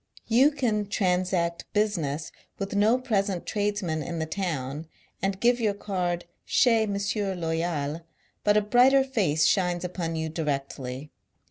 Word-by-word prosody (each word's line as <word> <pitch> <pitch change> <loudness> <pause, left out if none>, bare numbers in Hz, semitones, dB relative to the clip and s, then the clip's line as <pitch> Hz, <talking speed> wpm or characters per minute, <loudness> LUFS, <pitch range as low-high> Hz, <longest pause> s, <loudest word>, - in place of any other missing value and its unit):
You 250 +6 +5
can 230 -8 -1
transact 180 -3 0
business 165 -8 -1 0.3
with 195 0 -4
no 215 +4 +4
present 200 -7 -1
tradesman 205 -6 -1
in 170 +3 -4
the 160 - -1
town, 155 -5 -3 0.3
and 195 0 -1
give 240 +2 +3
your 215 -3 +1
card 180 -4 -2
" - - -49
chez 230 -3 +3
M. 200 -1 -2 0.4
Loyal," 165 -2 -2 0.4
but 210 0 +4
a - - +5
brighter 250 +6 +5
face 190 - +1
shines 175 0 +2
upon 175 -2 -3
you 160 0 -2
directly. 140 -3 -4
185 Hz, 140 wpm, -27 LUFS, 160-210 Hz, 0.4 s, You